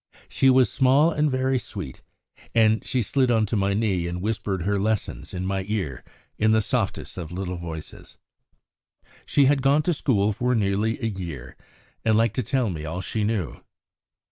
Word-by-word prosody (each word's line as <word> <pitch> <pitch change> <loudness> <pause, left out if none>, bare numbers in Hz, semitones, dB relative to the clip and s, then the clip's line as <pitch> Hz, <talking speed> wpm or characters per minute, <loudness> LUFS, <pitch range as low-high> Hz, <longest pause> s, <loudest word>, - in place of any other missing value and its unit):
She 135 - +3
was 130 -1 +4
small 140 +5 +4
and 150 -1 +1
very 130 0 +1
sweet, 90 - -8 0.5
and 110 -1 +4
she 125 -2 0
slid 130 +4 +1
on 110 -2 +3
to 105 - -2
my 100 -1 +1
knee 95 -5 0
and 85 +1 -4
whispered 100 -3 -2
her 100 +2 0
lessons 110 0 -2
in 90 0 -4
my 95 0 -1
ear 90 - -3 0.4
in 110 - +3
the 110 - +4
softest 100 - -2
of 85 -2 -6
little 90 0 -4
voices. 80 -2 -8 1.1
She 140 - +4
had 140 0 +3
gone 140 +3 +3
to 175 - +1
school 110 -8 +1
for 125 +4 0
nearly 105 +1 +1
a - - -3
year, 85 - -6 0.5
and 110 -1 +3
liked 115 -1 +2
to - - +2
tell 120 -2 0
me 80 -3 -5
all 80 +4 -4
she 105 +4 -2
knew. 105 - -2
110 Hz, 180 wpm, -24 LUFS, 95-125 Hz, 1.1 s, was